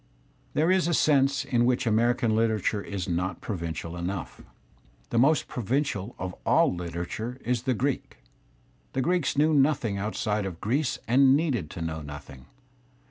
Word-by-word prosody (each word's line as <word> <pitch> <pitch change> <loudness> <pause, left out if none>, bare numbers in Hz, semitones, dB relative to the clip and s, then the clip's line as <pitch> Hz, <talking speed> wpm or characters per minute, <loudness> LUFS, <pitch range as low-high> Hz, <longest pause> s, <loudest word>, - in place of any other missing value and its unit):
There 160 +4 +3
is 185 -3 +3
a 170 - +2
sense 140 -3 +3
in 120 -3 +2
which 125 +1 +1
American 115 0 +2
literature 110 -2 +1
is 100 -3 -5
not 90 0 -2
provincial 85 -3 -5
enough. 90 +2 -5 0.7
The 115 - +2
most 145 +3 +3
provincial 125 -2 -2
of 90 0 -4
aU - - +4
Kterature 90 +8 -5
is 125 -1 0
the 130 - +3
Greek. 135 +4 -2 0.8
The 130 - 0
Greeks 165 -1 0
knew 155 +2 +4
nothing 135 -8 +2
outside 105 0 -1
of 85 -3 -7
Greece 130 +6 0
and 135 +3 +5
needed 130 - -1
to 85 -2 -6
know 80 -1 -4
nothing. 70 -3 -10
115 Hz, 150 wpm, -27 LUFS, 90-135 Hz, 0.8 s, and